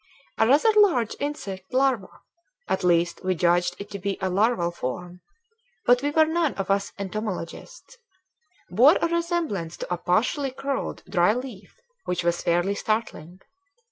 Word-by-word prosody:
A 220 - +4
rather 295 - +5
large 335 - +4
insect 200 -9 -5
larva 260 -6 +2 0.6
at 190 - -1
least 170 0 +1
we 185 0 0
judged 175 +1 +2
it 200 +1 -9
to 200 - -5
be 195 +1 -2
a 190 - -1
larval 200 -3 +1
form, 175 +4 -6 0.6
but 245 0 +5
we 290 - 0
were 315 +2 +4
none 320 -2 0
of 195 0 -2
us 200 0 0
entomologists 215 - -6 0.7
bore 250 - +5
a - - +1
resemblance 335 - -2
to - - -4
a - - -2
partially 225 +11 +1
curled 275 +1 -4
dry 175 +4 +3
leaf 250 -6 -8 0.3
which 180 -1 -2
was 170 0 0
fairly 175 +3 +1
startling. 200 -5 -3
200 Hz, 150 wpm, -25 LUFS, 180-270 Hz, 0.7 s, rather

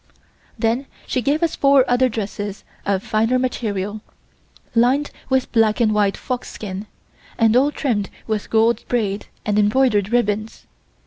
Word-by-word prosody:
Then 235 +4 0 0.2
she 255 - -1
gave 290 +7 +1
us 330 - +1
four 275 -2 +5
other 250 +1 +3
dresses 205 -2 -5 0.2
of 195 -1 +1
finer 225 +4 +1
material, 215 -5 -2 0.7
lined 255 +5 +2 0.2
with 260 -1 +1
black 225 -2 +3
and 220 -3 +3
white 205 -2 +2
fox 250 -2 -4
skin, 200 0 -6 0.5
and 225 0 +4
all 270 +3 +5
trimmed 225 -10 -1 0.2
with 215 -2 -3
gold 225 +1 +2
braid 210 -4 -1 0.2
and 210 0 +1
embroidered 210 -1 +2
ribbons. 215 -2 -1
225 Hz, 140 wpm, -21 LUFS, 210-255 Hz, 0.7 s, four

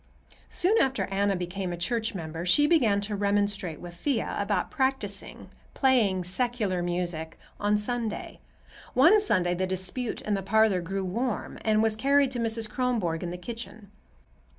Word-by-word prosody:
Soon 400 +6 +3
after 265 0 +1
Anna 200 0 +1
became 180 +1 -3
a 175 - -4
church 225 +5 -1
member 165 -1 -5
she 240 +12 +4
began 240 -11 +3
to 205 +1 -3
remonstrate 200 -4 0
with 175 0 -9
Thea 240 +8 -1
about 200 0 -1
practicing—playing 245 -3 0
"secular 205 -1 -1
music"—on 175 +3 -2
Sunday. 225 0 -3 0.6
One 340 +12 +6
Sunday 185 - +1
the 185 +1 -1
dispute 190 +6 -2
in 210 - -2
the 195 - 0
parlor 200 -1 +3
grew 190 +3 -3
warm 230 +5 -3
and 215 0 +3
was 220 -1 +3
carried 275 +3 +3
to 245 - -3
Mrs. 225 -1 -1
Kronborg 215 -9 -1
in 175 - -3
the 175 - -5
kitchen. 220 +1 -8
205 Hz, 150 wpm, -27 LUFS, 185-240 Hz, 0.6 s, One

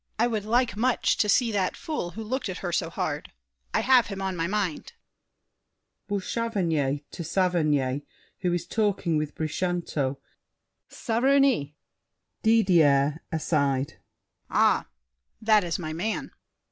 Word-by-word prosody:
I 225 - +3
would 220 -4 -2
like 235 -1 +2
much 245 +3 +2
To 210 - +2
see 235 +2 +3
that 195 -3 0
fool 300 - -3
who 225 - -4
looked 250 0 -3
at 185 - -4
her 175 - -1
so 170 -1 0
hard. 155 -2 -3 0.4
I - - +1
have 255 -2 +5
him 195 -2 -6
on 190 -1 -2
my 165 -1 -1
mind. 195 -5 -2 1.1
BOUCHAVANNES 185 - -1
(to 170 - -6
Saverny, 155 -7 +1 0.4
who 180 - 0
is 175 -1 -1
talking 195 -4 0
with 150 -1 -3
Brichanteau). 155 -4 -2 0.7
Saverny! 245 - +2 0.7
DIDIER 160 -10 +4
(aside). 140 -4 0 0.5
Ah, - - +3 0.5
That 215 -2 +4
is 170 -2 -2
my 155 -3 -5
man! 200 +7 -3
180 Hz, 130 wpm, -26 LUFS, 155-220 Hz, 1.1 s, have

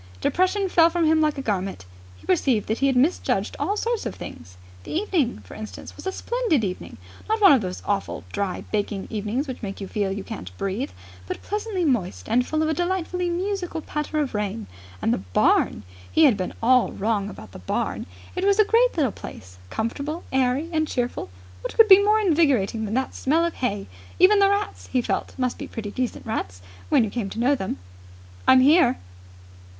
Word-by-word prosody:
Depression 370 - +1
fell 335 -2 +5
from 340 -1 +1
him 315 0 +4
like 305 -1 +1
a 275 - -4
garment. 195 - -2 0.3
He 90 - -18
perceived 210 +4 +2
that 220 - 0
he 275 - +3
had 265 - +2
misjudged 280 +8 +1
all 410 - 0
sorts 465 +1 -1
of - - -6
things. 90 +2 -10 0.3
The - - -9
evening, 325 - 0
for - - -12
instance, 215 0 -9
was - - -8
a - - 0
splendid 460 - 0
evening 185 -2 -5 0.3
not 440 +1 +2
one 400 -5 +8
of 260 - +4
those 185 -2 -5
awful 200 -1 -2
dry, 200 -2 -2
baking 205 -2 -1
evenings 220 +6 -2
which 260 - -6
make 195 -3 -5
you 195 - -5
feel 200 -1 -1
you 195 0 -4
can't 90 - -8
breathe, 195 +7 -2 0.4
but - - -5
pleasantly 415 -3 -2
moist 180 - -1
and 250 +2 +3
full 310 0 0
of 315 - +1
a - - +2
delightfully 360 0 -1
musical 360 -1 -2
patter 300 0 -4
of 290 -4 0
rain. 200 - -2 0.4
And 115 - +3
the - - -1
barn! 95 +2 +2 0.3
He 320 - +4
had 270 -7 +6
been 185 -2 -4
all 250 +1 +4
wrong 205 -1 -1
about 110 - -11
the - - -10
barn. 90 - -2 0.3
It 365 - -2
was 400 0 +4
a 430 - +6
great 470 0 +3
little 275 -8 +2
place, 90 - -11
comfortable, 280 - -3
airy, 265 +4 +1
and 315 -1 +1
cheerful. 245 - -2 0.3
What - - -5
could 450 - +8
be 390 -1 +9
more 425 +1 +4
invigorating 280 - +2
than 215 +2 -3
that 265 0 -1
smell 320 +5 +1
of 340 - -2
hay? 205 -6 -2 0.3
Even 400 +3 +6
the 395 0 +5
rats, 405 +1 -2
he 255 - +1
felt, - - -2
must 255 -2 -1
be - - -5
pretty 210 -3 -6
decent 250 +2 -3
rats, 95 - -3 0.3
when - - +5
you 215 - -3
came 225 -5 -3
to 220 - -6
know 255 +4 +3
them. 195 -9 -3 0.7
"I'm 260 0 +7
here!" 310 - +5
260 Hz, 205 wpm, -24 LUFS, -, 0.7 s, be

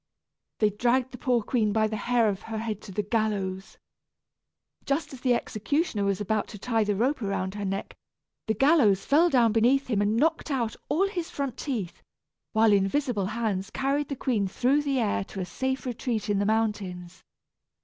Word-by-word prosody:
They 215 -1 +3
dragged 245 +4 +1
the 250 - -9
poor 245 -3 +1
queen 215 -2 +1
by 215 +1 +2
the 215 0 -2
hair 235 +1 +2
of 200 -2 -1
her 220 - -3
head 215 -2 -3
to 200 - -10
the 210 +3 -1
gallows. 200 -3 -2 1.1
Just 290 +1 -1
as 255 - -10
the 250 -2 +3
executioner 235 - -1
was 195 -1 0
about 210 +1 -1
to 210 - -9
tie 225 +1 0
the 205 -1 0
rope 250 +6 0
around 195 -2 -2
her 205 -1 -4
neck, 195 +1 -3 0.5
the 220 - +1
gallows 235 - +4
fell 325 +5 +4
down 240 -6 +4
beneath 245 +5 +3
him 205 -2 +2
and 210 +2 +1
knocked 320 +4 +1
out 240 -5 -1
all 340 +8 +2
his 355 -4 -4
front 275 -3 -3
teeth, 225 - -4 0.5
while 220 -1 +4
invisible 205 +1 +1
hands 215 -3 -2
carried 275 +4 -1
the 280 - -2
queen 230 -7 0
through 255 +9 +2
the 280 -2 -1
air 215 -5 +1
to 195 - -8
a 185 - -2
safe 265 +7 -3
retreat 230 -4 -2
in 200 - +1
the 200 - +1
mountains. 200 -5 -2
225 Hz, 190 wpm, -27 LUFS, 205-260 Hz, 1.1 s, gallows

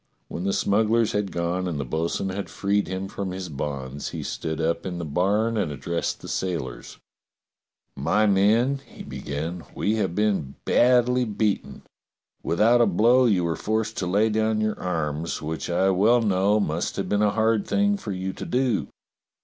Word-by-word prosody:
When 90 - -5
the 100 - +1
smugglers 110 +3 +2
had 105 -1 -1
gone 85 +2 -1
and 80 -5 -3
the 70 - -2
bo'sun 80 +7 -2
had 95 +1 -4
freed 100 +1 0
him 95 +1 -4
from 100 0 -4
his 90 -1 -5
bonds, 70 -1 -4
he - - -5
stood 80 0 -4
up 85 +1 0
in 90 -2 -4
the 85 - -4
barn 105 +9 +1
and 95 -8 0
addressed 85 +5 -3
the - - -9
sailors: 75 -10 -4 1.0
"My 85 +10 +2
men," 110 +7 +3
he - - -12
began, 80 +4 -5
"we 110 +2 0
have 95 -5 -1
been 100 -10 0
badly 125 0 +4
beaten. 105 -2 -2 0.6
Without 115 +8 +3
a 115 - +5
blow 120 +7 +4
you 100 -7 +3
were 85 -1 0
forced 110 0 -1
to 90 - -1
lay 105 +5 +3
down 110 0 +1
your 110 0 -1
arms, 80 -2 -2
which 80 +2 -4
I 95 +3 +2
well 110 +6 +4
know 100 +1 +2
must 85 -3 -1
have 100 - -2
been 105 0 +1
a 105 - +4
hard 110 0 +1
thing 205 0 +2
for 155 - -6
you 95 0 -3
to - - -7
do. 125 -3 0
100 Hz, 180 wpm, -25 LUFS, 85-110 Hz, 1.0 s, a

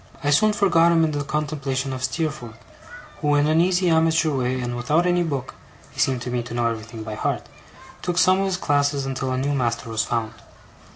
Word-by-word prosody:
I 145 - +1
soon 215 +9 +4
forgot 175 -5 +3
him 165 -1 +4
in 160 - +1
the 145 -1 -2
contemplation 140 -3 -2
of 130 0 -5
Steerforth, 130 -5 -3 0.6
who, 145 0 +2
in 145 0 +3
an 155 +2 +3
easy 180 +1 +2
amateur 160 -1 +3
way, 130 0 -1
and 120 -1 -3
without 150 +8 +1
any 175 0 +2
book 140 -6 -3 0.4
(he - - -12
seemed 130 -2 +1
to 125 - -4
me 120 -1 -1
to 120 0 -7
know 120 -1 0
everything 115 -1 -4
by 110 0 -6
heart), - - -2 0.6
took 175 -1 -2
some 185 +1 +4
of 195 - +1
his 190 -2 -1
classes 145 -3 +1
until 130 -1 -3
a 130 - -1
new 140 +2 0
master 120 -3 -1
was 110 0 0
found. 115 -2 -2
140 Hz, 215 wpm, -23 LUFS, 125-160 Hz, 0.6 s, soon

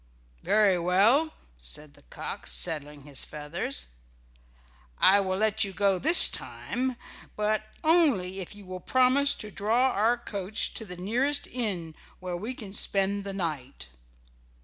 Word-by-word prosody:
"Very 205 -4 +2
well," 210 - +3 0.2
said 140 - -8
the - - -21
cock, - - -8
settling 150 -4 0
his 145 -2 -3
feathers. 170 - -4 1.1
"I 200 +2 +5
will 190 -1 -1
let 220 +1 +3
you 195 -2 -3
go 195 -1 +2
this 325 - +9
time, 255 0 -4 0.4
but 215 0 -1 0.2
only 280 - +2
if 190 +2 -8
you 205 -1 -13
will 185 0 -8
promise 260 +6 +2
to 215 - -6
draw 230 +7 +1
our 225 +4 +1
coach 205 -3 -3
to 220 - -6
the 180 -3 -9
nearest 250 +10 -1
inn, 190 -10 -2 0.3
where 180 -1 -5
we 220 +9 -5
can 200 -5 -9
spend 200 0 0
the 195 - -5
night." 150 - -6
200 Hz, 145 wpm, -27 LUFS, 180-235 Hz, 1.1 s, this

